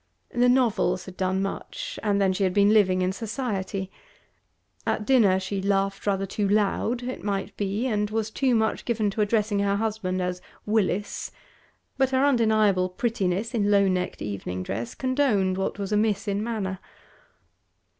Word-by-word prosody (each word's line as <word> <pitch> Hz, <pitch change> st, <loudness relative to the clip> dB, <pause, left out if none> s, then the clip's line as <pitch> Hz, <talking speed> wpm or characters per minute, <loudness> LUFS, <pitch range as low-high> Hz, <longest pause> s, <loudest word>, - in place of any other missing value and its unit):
The 245 Hz, +1 st, +4 dB
novels 230 Hz, -7 st, +2 dB
had 190 Hz, -, -10 dB
done 190 Hz, +1 st, 0 dB
much; -, -, -5 dB
and 205 Hz, -2 st, +1 dB
then 190 Hz, -1 st, +3 dB
she 195 Hz, -, -1 dB
had 185 Hz, -1 st, 0 dB
been 205 Hz, +1 st, +5 dB
living 185 Hz, -4 st, +4 dB
in 185 Hz, -, +1 dB
society. 200 Hz, -4 st, -3 dB, 1.0 s
At 210 Hz, -, 0 dB
dinner 210 Hz, -8 st, +4 dB
she 195 Hz, +1 st, -3 dB
laughed 195 Hz, 0 st, 0 dB
rather 195 Hz, -1 st, +1 dB
too 200 Hz, +1 st, -1 dB
loud, 215 Hz, +4 st, +1 dB
it 255 Hz, +1 st, -5 dB
might 200 Hz, -1 st, -2 dB
be, 205 Hz, +4 st, -2 dB
and 210 Hz, -4 st, 0 dB
was 220 Hz, 0 st, -2 dB
too 255 Hz, +1 st, +1 dB
much 220 Hz, -1 st, 0 dB
given 215 Hz, -4 st, 0 dB
to 215 Hz, -, -2 dB
addressing 210 Hz, -1 st, +1 dB
her 200 Hz, 0 st, +1 dB
husband 205 Hz, -3 st, -2 dB
as 180 Hz, 0 st, -2 dB, 0.2 s
'Willis;' 205 Hz, -2 st, -1 dB, 0.7 s
but 265 Hz, -1 st, +3 dB
her 265 Hz, +1 st, +2 dB
undeniable 215 Hz, -8 st, +3 dB
prettiness 205 Hz, +1 st, -1 dB
in 205 Hz, -3 st, +1 dB
low 200 Hz, -1 st, +4 dB
necked 180 Hz, -1 st, -1 dB
evening 95 Hz, -3 st, -4 dB
dress 115 Hz, +6 st, -4 dB
condoned 255 Hz, -8 st, +1 dB
what 190 Hz, +1 st, -2 dB
was 200 Hz, -1 st, -4 dB
amiss 210 Hz, 0 st, +1 dB
in 200 Hz, +1 st, -1 dB
manner. 205 Hz, -5 st, -3 dB
205 Hz, 165 wpm, -25 LUFS, 190-225 Hz, 1.0 s, been